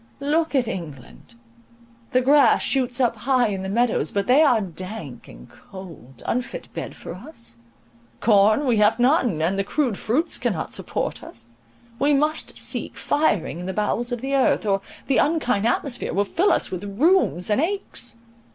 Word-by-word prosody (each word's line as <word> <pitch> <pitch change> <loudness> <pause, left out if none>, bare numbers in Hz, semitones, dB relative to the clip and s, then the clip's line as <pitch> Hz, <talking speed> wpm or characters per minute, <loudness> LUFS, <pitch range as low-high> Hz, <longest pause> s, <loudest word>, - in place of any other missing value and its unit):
Look 300 +2 0
at 255 -4 +2
England! 165 - -8 0.7
the 255 -2 +2
grass 275 -2 +5
shoots 255 -2 0
up 240 -3 +2
high 250 0 +2
in 195 -2 -3
the 190 - -4
meadows; 235 +3 +1
but 200 -1 -1
they 260 +5 +5
are 255 -7 +5
dank 185 - -7
and - - -13
cold, 160 - -13
unfit 250 - -3
bed - - -6
for - - -8
us. 115 - -8 0.6
Corn 215 +5 +4
we 240 -4 +2
have 210 +1 +4
none, 245 - +2
and 190 +4 0
the - - +2
crude 245 -1 -1
fruits 300 +10 0
cannot 215 -10 -2
support - - -3
us. - - -8 0.5
We 285 +1 +3
must 305 +3 -1
seek - - -2
firing 205 - 0
in 180 - -6
the 190 - -3
bowels 230 +4 -1
of 245 -2 -3
the 270 +1 -3
earth, 265 -4 +2
or 195 -1 +1 0.2
the 270 - +1
unkind 250 -9 +1
atmosphere 245 +1 -2
will 200 +1 +2
fill 365 - +2
us - - +1
with 185 +1 -4 0.2
rheums 310 - +3
and 210 - +3
aches. 390 -6 -2
235 Hz, 170 wpm, -23 LUFS, 190-275 Hz, 0.7 s, grass